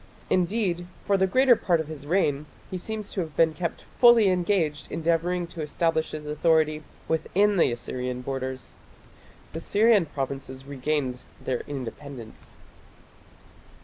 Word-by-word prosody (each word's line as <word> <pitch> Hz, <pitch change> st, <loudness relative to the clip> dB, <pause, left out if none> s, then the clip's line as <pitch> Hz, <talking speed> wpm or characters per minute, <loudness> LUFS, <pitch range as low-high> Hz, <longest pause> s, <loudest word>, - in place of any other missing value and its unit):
Indeed 180 Hz, -1 st, +1 dB, 0.2 s
for 200 Hz, -, +3 dB
the 190 Hz, 0 st, +3 dB
greater 255 Hz, +5 st, +5 dB
part 175 Hz, -6 st, +1 dB
of 160 Hz, -, -2 dB
his 145 Hz, -2 st, -8 dB
reign 150 Hz, -4 st, +1 dB, 0.2 s
he 185 Hz, -, -2 dB
seems 215 Hz, +1 st, -4 dB
to 190 Hz, -, -1 dB
have 160 Hz, -4 st, -6 dB
been 160 Hz, +1 st, +4 dB
kept 170 Hz, +2 st, -4 dB, 0.2 s
fully 235 Hz, -4 st, +7 dB
engaged 175 Hz, -5 st, 0 dB
endeavouring 170 Hz, +2 st, 0 dB
to 165 Hz, -, -5 dB
establish 160 Hz, +1 st, 0 dB
his 150 Hz, -1 st, -6 dB
authority 155 Hz, 0 st, +2 dB, 0.3 s
within 200 Hz, +5 st, +2 dB
the 165 Hz, -, +4 dB
Assyrian 125 Hz, +1 st, -4 dB
borders. 130 Hz, -1 st, -5 dB, 0.8 s
The 165 Hz, -, -4 dB
Syrian 205 Hz, -1 st, +3 dB
provinces 135 Hz, -1 st, -5 dB
regained 140 Hz, -2 st, -2 dB, 0.2 s
their 125 Hz, -2 st, -2 dB
independence. 135 Hz, -3 st, -8 dB
160 Hz, 135 wpm, -26 LUFS, 140-185 Hz, 0.8 s, fully